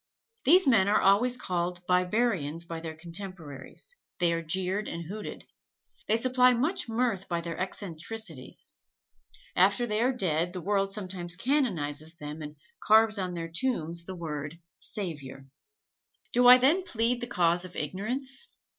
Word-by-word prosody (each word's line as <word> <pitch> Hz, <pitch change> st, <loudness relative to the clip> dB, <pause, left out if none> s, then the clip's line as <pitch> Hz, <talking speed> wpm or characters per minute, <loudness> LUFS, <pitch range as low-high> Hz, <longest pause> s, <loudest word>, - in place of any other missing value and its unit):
These 365 Hz, +7 st, +6 dB
men 220 Hz, -7 st, +5 dB
are 205 Hz, -, +4 dB
always 230 Hz, +6 st, +4 dB
called 175 Hz, -4 st, -3 dB
barbarians 180 Hz, -3 st, +1 dB
by 165 Hz, -1 st, -5 dB
their 160 Hz, -1 st, -6 dB
contemporaries: 170 Hz, -, -8 dB, 0.2 s
they 170 Hz, -1 st, +2 dB
are 165 Hz, -, -1 dB
jeered 190 Hz, +5 st, -1 dB
and 170 Hz, 0 st, -4 dB
hooted. 205 Hz, +5 st, -7 dB, 0.6 s
They 215 Hz, -, +3 dB
supply 250 Hz, +1 st, +4 dB
much 280 Hz, +2 st, 0 dB
mirth 225 Hz, -4 st, 0 dB
by 170 Hz, -1 st, -1 dB
their 170 Hz, 0 st, -5 dB
eccentricities. 185 Hz, -, -6 dB, 0.8 s
After 200 Hz, +6 st, +4 dB
they 215 Hz, -1 st, -1 dB
are 250 Hz, +2 st, +3 dB
dead 175 Hz, -7 st, 0 dB
the 180 Hz, -, -5 dB
world 195 Hz, +1 st, +1 dB
sometimes 185 Hz, -4 st, -5 dB
canonizes 170 Hz, -, -1 dB
them 150 Hz, -1 st, -7 dB
and 150 Hz, 0 st, -7 dB, 0.3 s
carves 220 Hz, 0 st, +5 dB
on 185 Hz, -1 st, -2 dB
their 165 Hz, -1 st, -5 dB
tombs 170 Hz, -9 st, -1 dB
the 185 Hz, -, -6 dB
word 155 Hz, -2 st, -5 dB, 0.2 s
"Savior." 145 Hz, -9 st, -6 dB, 0.9 s
Do 245 Hz, +1 st, +5 dB
I 250 Hz, 0 st, +11 dB
then 285 Hz, +9 st, +4 dB
plead 240 Hz, -7 st, +1 dB
the 240 Hz, -, -2 dB
cause 175 Hz, -5 st, +2 dB
of 180 Hz, -1 st, -10 dB
ignorance? 260 Hz, -, -3 dB
185 Hz, 145 wpm, -29 LUFS, 170-230 Hz, 0.9 s, I